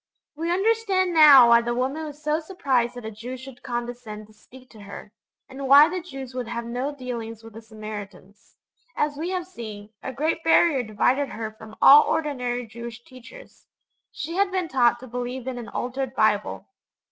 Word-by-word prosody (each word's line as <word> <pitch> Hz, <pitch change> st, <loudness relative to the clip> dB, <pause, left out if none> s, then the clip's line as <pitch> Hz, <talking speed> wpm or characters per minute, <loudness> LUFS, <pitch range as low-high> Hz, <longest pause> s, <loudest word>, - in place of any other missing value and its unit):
We 330 Hz, +3 st, -3 dB
understand 385 Hz, -2 st, +1 dB
now 285 Hz, -6 st, +8 dB
why 235 Hz, 0 st, +6 dB
the 240 Hz, 0 st, -2 dB
woman 270 Hz, +6 st, -2 dB
was 295 Hz, -1 st, -9 dB
so 305 Hz, +1 st, +1 dB
surprised 270 Hz, -9 st, -1 dB
that 245 Hz, -2 st, -8 dB
a 220 Hz, -, -5 dB
Jew 235 Hz, +5 st, -8 dB
should 260 Hz, -1 st, -12 dB
condescend 240 Hz, -3 st, -6 dB
to 215 Hz, -, -21 dB
speak 255 Hz, +4 st, -17 dB
to 220 Hz, -, -15 dB
her, 200 Hz, +1 st, -10 dB, 0.4 s
and 270 Hz, 0 st, -7 dB
why 285 Hz, +4 st, +8 dB
the 365 Hz, 0 st, -4 dB
Jews 270 Hz, -6 st, -9 dB
would 250 Hz, -2 st, -4 dB
have 235 Hz, 0 st, -5 dB
'no 250 Hz, +4 st, -3 dB
dealings 235 Hz, -5 st, -7 dB
with 225 Hz, -1 st, -13 dB
the 225 Hz, -, -10 dB
Samaritans.' 210 Hz, -2 st, -10 dB, 0.4 s
As 295 Hz, -1 st, -1 dB
we 320 Hz, +5 st, -4 dB
have 365 Hz, -2 st, -3 dB
seen, 215 Hz, -, -9 dB
a -, -, -5 dB
great 315 Hz, +5 st, -2 dB
barrier 325 Hz, -4 st, +4 dB
divided 245 Hz, +5 st, 0 dB
her 220 Hz, -1 st, -5 dB
from 220 Hz, 0 st, -13 dB
all 290 Hz, +2 st, +10 dB
ordinary 250 Hz, -5 st, -2 dB
Jewish 235 Hz, +1 st, -9 dB
teachers 260 Hz, -, -15 dB, 0.4 s
she 320 Hz, +3 st, -6 dB
had 400 Hz, 0 st, +2 dB
been 370 Hz, -2 st, -1 dB
taught 240 Hz, -4 st, +2 dB
to 255 Hz, -, -10 dB
believe 245 Hz, +1 st, -5 dB
in 255 Hz, -2 st, -4 dB
an 235 Hz, -, -8 dB
altered 260 Hz, +1 st, -4 dB
Bible. 210 Hz, -1 st, +1 dB
250 Hz, 185 wpm, -24 LUFS, 230-295 Hz, 0.4 s, all